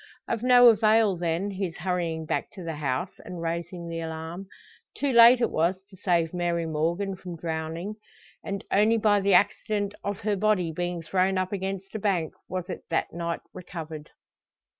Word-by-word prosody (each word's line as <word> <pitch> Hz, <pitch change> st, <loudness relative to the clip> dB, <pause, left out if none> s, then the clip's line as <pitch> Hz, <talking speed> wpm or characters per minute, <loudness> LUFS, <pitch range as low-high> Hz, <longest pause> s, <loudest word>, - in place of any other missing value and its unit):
Of 230 Hz, -, -2 dB
no 245 Hz, -1 st, +8 dB
avail, 215 Hz, -2 st, +4 dB
then, 175 Hz, +3 st, -1 dB
his 190 Hz, -4 st, -4 dB
hurrying 170 Hz, -2 st, -2 dB
back -, -, -2 dB
to 190 Hz, -, -9 dB
the 165 Hz, -2 st, -4 dB
house, 145 Hz, +5 st, -2 dB
and 180 Hz, -1 st, -7 dB
raising 170 Hz, +1 st, -4 dB
the 165 Hz, 0 st, -4 dB
alarm. 165 Hz, +3 st, -6 dB, 0.5 s
Too 285 Hz, -1 st, 0 dB
late 235 Hz, +1 st, +8 dB
it -, -, +2 dB
was 180 Hz, +4 st, 0 dB
to -, -, -13 dB
save 170 Hz, -3 st, +1 dB
Mary 170 Hz, -1 st, 0 dB
Morgan 170 Hz, +5 st, -1 dB
from 180 Hz, -2 st, -8 dB
drowning; 165 Hz, +5 st, -4 dB, 0.5 s
and, 200 Hz, -1 st, -4 dB
only 215 Hz, +3 st, +4 dB
by 205 Hz, -2 st, +3 dB
the 195 Hz, -1 st, +4 dB
accident 205 Hz, +2 st, +1 dB
of 200 Hz, 0 st, -3 dB
her 210 Hz, 0 st, 0 dB
body 195 Hz, -4 st, +1 dB
being 175 Hz, +1 st, -3 dB
thrown 190 Hz, +2 st, +1 dB
up 185 Hz, 0 st, -1 dB
against 195 Hz, 0 st, -4 dB
a 220 Hz, -, -3 dB
bank 185 Hz, -6 st, 0 dB, 0.2 s
was 185 Hz, -1 st, -3 dB
it 180 Hz, -, -5 dB
that -, -, -1 dB
night 170 Hz, 0 st, -3 dB
recovered. 160 Hz, -4 st, -8 dB
180 Hz, 175 wpm, -27 LUFS, 165-200 Hz, 0.5 s, no